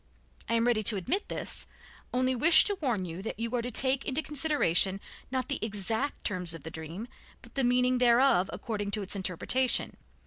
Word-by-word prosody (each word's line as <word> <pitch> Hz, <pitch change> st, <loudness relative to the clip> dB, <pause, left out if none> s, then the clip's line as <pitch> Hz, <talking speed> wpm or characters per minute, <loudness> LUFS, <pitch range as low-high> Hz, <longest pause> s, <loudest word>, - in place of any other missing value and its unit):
I 230 Hz, -, +1 dB
am 230 Hz, 0 st, +2 dB
ready 240 Hz, -3 st, +2 dB
to 215 Hz, +1 st, +3 dB
admit 320 Hz, -, -1 dB
this, -, -, -4 dB, 0.4 s
only 255 Hz, +1 st, +1 dB
wish 315 Hz, +6 st, +7 dB
to 410 Hz, -, 0 dB
warn 235 Hz, -10 st, -1 dB
you 170 Hz, +1 st, -7 dB
that 220 Hz, -, -6 dB
you 230 Hz, +1 st, -3 dB
are 240 Hz, -, 0 dB
to 245 Hz, -, -4 dB
take 265 Hz, +3 st, +1 dB
into 285 Hz, +4 st, -2 dB
consideration 270 Hz, -, +2 dB, 0.3 s
not 255 Hz, -1 st, -2 dB
the -, -, -4 dB
exact 220 Hz, +6 st, -2 dB
terms 180 Hz, -5 st, +1 dB
of 165 Hz, -, -11 dB
the 160 Hz, -, -7 dB
dream, 160 Hz, +8 st, -6 dB, 0.4 s
but -, -, -16 dB
the 270 Hz, -, 0 dB
meaning 250 Hz, +1 st, +2 dB
thereof 240 Hz, -5 st, +4 dB
according 205 Hz, -3 st, -4 dB
to 210 Hz, -, -4 dB
its 195 Hz, -, -2 dB
interpretation. 200 Hz, +7 st, 0 dB
230 Hz, 195 wpm, -29 LUFS, 195-260 Hz, 0.4 s, wish